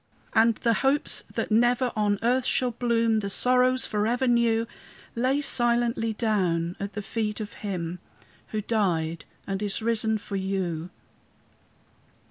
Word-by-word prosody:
And 230 0 +4
the 230 +1 +1
hopes 275 +2 +1
that - - -3
never 240 +2 +3
on 205 -1 +1
earth 250 +2 +2
shall 250 -1 +1
bloom, 230 -2 +1
The 200 -1 -3
sorrows 255 +4 +3
forever 225 +5 0
new, 235 -2 +2 0.5
Lay 260 +4 +1
silently 240 -3 +1
down 185 -6 0
at 200 0 -5
the 210 +1 -5
feet 210 +1 -3
of 210 -1 -6
Him 180 -4 -4 0.5
Who 215 - -3
died 170 -8 -1 0.2
and 195 0 -3
is 205 -2 0
risen 220 -1 +1
for 200 -1 -5
you. 185 -4 -2
220 Hz, 135 wpm, -26 LUFS, 200-240 Hz, 0.5 s, And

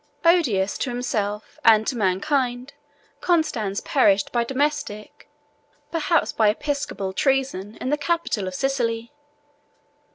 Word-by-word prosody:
Odious 245 - +3
to 265 - -1
himself 215 -4 -3
and 220 -1 +6
to 255 - -1
mankind, 245 +6 0 0.5
Constans 235 - 0
perished 200 -1 +2
by 240 -1 +1
domestic, 270 -4 -3 0.6
perhaps 330 0 +1
by 215 -2 +3
episcopal, 280 -5 -2
treason, 260 -5 0
in 260 - -2
the 295 - +2
capital 330 - -1
of 185 - -5
Sicily. 235 -2 -1
245 Hz, 110 wpm, -23 LUFS, 210-290 Hz, 0.6 s, and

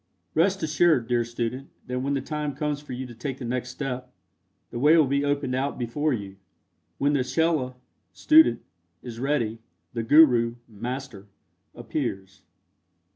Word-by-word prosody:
Rest 190 +4 +2
assured, 155 -5 +3
dear 120 -1 +2
student, 120 +3 -4 0.2
that 125 0 -3
when 140 +2 -1
the 135 - -1
time 150 0 -4
comes 150 0 -2
for 145 -3 -8
you 130 +1 -4
to 120 - -10
take 130 +3 -5
the 130 - -7
next 125 +1 -3
step, 125 -1 -5 0.6
the 120 - -4
way 150 +5 +6
will 155 - +6
be 140 +1 0
opened 145 -2 0
out 135 +2 -1
before 145 +6 -1
you. 100 -5 -4 0.6
"When 145 +1 +1
the 135 -3 +2
chela 130 -1 0 0.4
(student) 315 +1 +5 0.4
is 115 -2 -8
ready, 120 -5 -1 0.3
the 115 - -2
guru 120 -3 +5
(master) 120 -1 -6 0.5
appears." 95 0 -4
130 Hz, 155 wpm, -25 LUFS, 120-145 Hz, 0.6 s, way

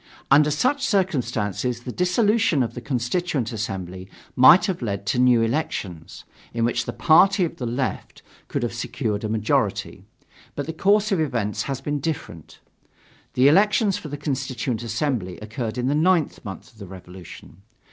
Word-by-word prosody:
Under 150 +2 +6
such 255 - 0
circumstances 125 - -1
the 125 - -6
dissolution 180 - +2
of 115 - -4
the 120 - -7
Constituent 130 0 -2
Assembly 95 -3 -5 0.3
might 150 +9 +7
have 190 -7 -3
led 100 -4 -3
to 115 +5 0
new 125 -2 +4
elections, 110 - -4 0.3
in 115 -1 +1
which 120 0 -1
the - - -3
party 180 +4 +4
of 165 - -7
the 125 - -4
Left 125 +3 -4 0.2
could - - -3
have - - -2
secured 105 -1 -3
a 110 - -2
majority. 110 -1 -1 0.5
But 145 - -3
the 160 - -5
course 205 +5 +2
of 190 - +2
events 115 -9 -1
has 135 -1 -3
been 145 +1 -2
different. 130 - -6 0.8
The 130 +2 +5
elections 205 +5 +3
for - - -8
the 145 0 -6
Constituent 130 -5 -3
Assembly 115 -5 -2
occurred 110 +2 -5
in 125 - -1
the 135 - +1
ninth 165 +1 +1
month 95 -4 -9
of 110 - -23
the 100 - -9
Revolution. 90 -1 -12
125 Hz, 165 wpm, -23 LUFS, 110-160 Hz, 0.8 s, might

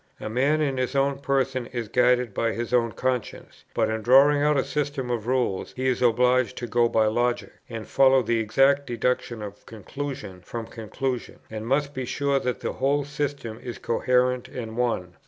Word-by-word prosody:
A 110 - -5
man 140 +6 +2
in 140 -3 0
his 130 +2 -2
own 140 0 +1
person 135 -3 0
is 120 -3 -4
guided 125 0 +2
by 115 +2 0
his 120 +1 -4
own 115 -2 +3
conscience; 125 +1 -4
but - - +2
in 110 0 -2
drawing 140 +5 +5
out 150 0 +3
a 135 - +2
system 140 -2 -2
of 115 -2 -3
rules 125 -7 -1
he 130 +1 0
is 125 -1 0
obliged 125 +1 +3
to 120 - -4
go 120 0 +2
by 110 -1 +3
logic, 120 +3 0 0.2
and 115 -2 -6
follow 135 -1 +4
the 115 0 +1
exact 135 +6 +3
deduction 120 -1 -1
of 100 0 -9
conclusion 110 -3 -7
from 115 +5 -6
conclusion, 120 +3 -4
and 110 0 -5
must 140 +2 0
be 130 -2 -4
sure 140 +2 0
that 125 -2 -3
the - - -3
whole 140 +2 0
system 140 -6 -4
is 120 -2 -6
coherent 125 +1 +1
and 115 -5 -7
one. 115 -8 -1
125 Hz, 190 wpm, -25 LUFS, 115-135 Hz, 0.2 s, drawing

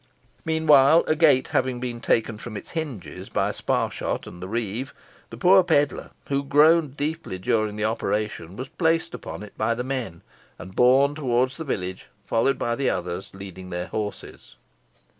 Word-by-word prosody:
Meanwhile, 160 -1 +5
a 155 - +1
gate 150 -5 +4
having 130 -2 0
been 120 -1 -4
taken 115 -2 +1
from 110 -2 -7
its - - -10
hinges 145 - -6
by - - 0
Sparshot - - -2
and 90 - -11
the 95 - -5
reeve, 115 +4 -3 0.3
the - - -9
poor 190 0 +6
pedlar, 145 -5 +1 0.2
who 140 0 0
groaned 150 +1 +4
deeply 155 - -3
during 105 +3 0
the 105 0 -1
operation, 105 -5 -2
was 130 +4 -6
placed 165 +1 0
upon 100 -6 -7
it 105 - -12
by 115 +2 +1
the 125 - -3
men, 125 -10 -4 0.3
and 95 +3 -10
borne 135 +3 +5
towards 130 -3 0
the 165 - -4
village, 95 -10 -4 0.2
followed 135 +4 +1
by 120 0 -1
the 135 +1 0
others, 90 +1 -3
leading 95 -1 -9
their 90 0 -4
horses. 105 -1 -6
125 Hz, 165 wpm, -24 LUFS, 105-145 Hz, 0.3 s, poor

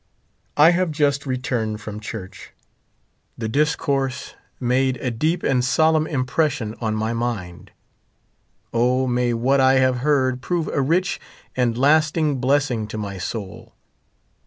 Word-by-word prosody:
I 155 +3 +7
have 180 0 +1
just 145 -2 0
returned 125 -4 -2
from 105 0 -7
church. 105 -3 -8 0.8
The 115 - -3
discourse 140 0 -1 0.3
made 130 +1 +1
38 - - -8
a 125 - 0
deep 160 +9 -1
and 125 -2 +2
solemn 155 +4 +3
impression 130 -4 -1
on 110 -2 -1
my 110 +1 -1
mind. 115 -7 -4 1.0
O, 125 +3 +2
may 125 -1 +1
what 130 +4 +2
I 130 0 +5
have 130 -1 +3
heard 130 -2 +1
prove 170 +2 -1
a 140 - 0
rich 175 +6 0 0.3
and 120 -2 +1
lasting 150 +1 +3
blessing 130 -4 +1
to 110 - -6
my 100 -3 -5
soul. 100 -1 -6
130 Hz, 135 wpm, -22 LUFS, 115-145 Hz, 1.0 s, I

